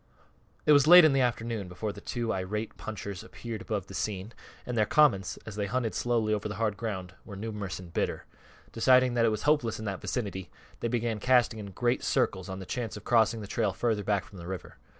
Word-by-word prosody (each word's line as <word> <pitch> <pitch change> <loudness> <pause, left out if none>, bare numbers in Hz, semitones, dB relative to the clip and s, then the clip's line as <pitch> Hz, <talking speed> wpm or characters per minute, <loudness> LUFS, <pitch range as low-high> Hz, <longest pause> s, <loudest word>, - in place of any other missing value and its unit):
It - - +5
was 145 -1 +6
late 175 0 +10
in 155 - +5
the 135 - +3
afternoon 115 -4 -1
before 100 +4 -4
the - - -11
two 120 -2 -2
irate 105 +4 -3
punchers 100 -2 -6
appeared 115 -1 -7
upon 105 -3 -2
the 95 - -12
scene, 100 +2 -3 0.3
and 125 - -4
their 110 -2 +2
comments, 120 -12 +3
as 110 - -7
they 100 -1 -1
hunted 120 0 -1
slowly 115 -3 +1
over 105 0 -1
the 105 - -5
hard 110 -3 0
ground, 95 -4 -5
were 100 - -9
numerous 105 -1 -5
and 90 -2 -11
bitter. - - -1 0.5
Deciding 130 +1 +4
that 120 -1 +3
it - - +4
was 110 -1 -2
hopeless 145 -7 +2
in 110 - -6
that 100 -2 -4
vicinity, 100 -7 -3 0.3
they - - -1
began 115 -2 -1
casting 120 -1 +3
in 100 -1 -7
great 120 +6 0
circles 95 0 0
on 95 - -4
the 95 - -7
chance 115 +1 -4
of 105 - -10
crossing 115 -1 +3
the 100 - -7
trail 105 -2 0
further 110 0 0
back 100 -2 0
from 95 - -13
the 85 - -8
river. 95 -1 -7
110 Hz, 225 wpm, -29 LUFS, 100-120 Hz, 0.5 s, late